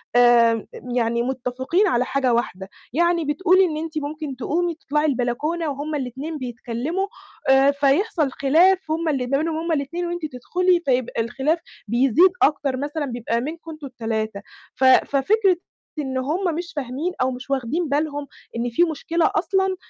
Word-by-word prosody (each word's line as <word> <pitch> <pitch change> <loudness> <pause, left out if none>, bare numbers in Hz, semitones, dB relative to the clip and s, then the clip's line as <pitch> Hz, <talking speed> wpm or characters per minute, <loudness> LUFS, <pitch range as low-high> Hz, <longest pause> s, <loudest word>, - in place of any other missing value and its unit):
آآ، 235 -2 +5 0.3
يعني 235 0 +1
متفقين 260 - 0
على 250 -6 +2
حاجة 260 -2 +1
واحدة. 195 -5 -2 0.2
يعني 340 +1 +2
بتقولي 370 +6 +4
إن 310 -3 -2
أنتِ 320 0 -5
ممكن 300 -1 -4
تقومي 335 +7 -1
تطلَعي 300 -1 -1
البلكونة 295 +5 -1
وهُم 290 +2 -4
الاتنين 280 +4 -4
بيتكلموا 250 +8 -3 0.4
آآ، 270 +1 +6
فيحصَل 285 +2 +1
خلاف 330 +6 +3
هُم 325 0 0
ال 255 -4 -1
ما 275 - +3
بينهم 315 +1 -1
هُم 330 +1 -2
الاتنين 325 +4 -1
وأنتِ 345 -1 -3
تدخلي، 350 +7 +1
فيبقى 250 -3 0
الخلاف 275 +8 0 0.3
بيزيد 270 - +4
أكتر 280 -3 +2
مثلًا 290 +2 -3
بيبقى 235 -2 -2
منكم 325 +4 -6
أنتم 305 -3 -8
ال3. 220 -4 -3 0.3
ف 260 - -3
ففكرة 350 +9 +4 0.4
إن 265 -2 -2
هُم 320 +6 -1
مش 340 0 -5
فاهمين 290 +5 -3
أو 260 +1 +2
مش 255 +2 -8
واخدين 275 +5 -1
بالهم 290 0 -1 0.3
إن 235 +1 -1
في 240 +9 +3
مشكلة 325 +1 0
أصلًا، 380 +2 +1
285 Hz, 155 wpm, -22 LUFS, 255-330 Hz, 0.4 s, آآ